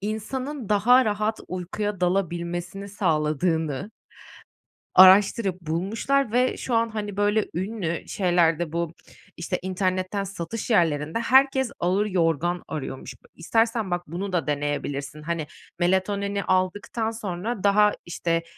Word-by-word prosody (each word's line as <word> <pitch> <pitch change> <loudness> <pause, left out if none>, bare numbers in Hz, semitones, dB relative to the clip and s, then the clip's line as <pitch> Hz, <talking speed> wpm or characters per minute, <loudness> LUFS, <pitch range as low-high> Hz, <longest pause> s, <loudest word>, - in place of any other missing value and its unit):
insanın 235 +5 -4
daha 245 +5 +5
rahat 215 +1 -1
uykuya 185 +2 -4
dalabilmesini 175 +1 -2
sağladığını 160 -2 0 1.1
araştırıp 190 0 +6
bulmuşlar 210 - 0
ve 250 +2 +2
şu 245 - -4
an, 230 0 +2
hani, 210 -2 -5
böyle, 205 +1 +2
ünlü 185 -2 -3
şeylerde 175 -3 +1
bu, 170 -1 -2 0.4
işte, 175 +1 -3
internetten 185 +1 -1
satış 195 +4 -5
yerlerinde 160 -2 +1
herkes 265 +1 +3
ağır 190 +4 +1
yorgan 175 -2 0
arıyormuş. 135 -3 -6 0.2
İstersen, 225 +2 0
bak, 175 -1 -2
bunu 185 +5 -4
da 170 -3 0
deneyebilirsin. 145 0 -3
Hani, 160 -1 -3 0.3
melatonini 200 +2 0
aldıktan 200 +5 0
sonra 210 0 -4
daha, 210 +1 +5
işte, 165 -1 -1
185 Hz, 115 wpm, -25 LUFS, 170-210 Hz, 1.1 s, araştırıp